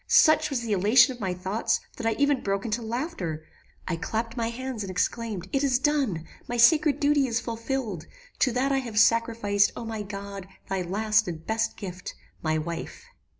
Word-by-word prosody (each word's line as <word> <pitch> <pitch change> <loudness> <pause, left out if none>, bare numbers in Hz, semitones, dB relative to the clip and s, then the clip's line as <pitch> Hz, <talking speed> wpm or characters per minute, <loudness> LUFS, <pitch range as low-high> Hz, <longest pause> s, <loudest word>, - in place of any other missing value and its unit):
Such 310 -1 +5
was 270 -4 -1
the 230 -2 -4
elation 230 +7 +5
of 245 - -13
my 190 -4 -2
thoughts, 190 +5 0 0.2
that 225 - -2
I 225 - +2
even 285 -1 +2
broke 195 +1 -1
into 230 +1 -1
laughter. 220 - -4 0.4
I 170 - -1
clapped 225 +6 -3
my 230 -2 -1
hands 255 -1 -5
and 195 - -6
exclaimed, 195 0 -2
'It 275 - +1
is 265 -3 +3
done! 260 - 0 0.2
My 240 - -3
sacred 300 +3 +5
duty 285 -1 +3
is 230 -1 0
fulfilled! 230 - -4 0.3
To 260 - +3
that 260 +3 0
I 270 - +2
have 230 -5 -1
sacrificed, 225 -3 +3
O 235 - -6
my 220 -1 -4
God! 200 -1 -7 0.2
thy 195 -1 -1
last 215 +4 +1
and 165 -2 -6
best 225 +1 -1
gift, 185 -3 -7 0.3
my 155 -1 0
wife!' 165 - -5
225 Hz, 190 wpm, -26 LUFS, 195-255 Hz, 0.4 s, Such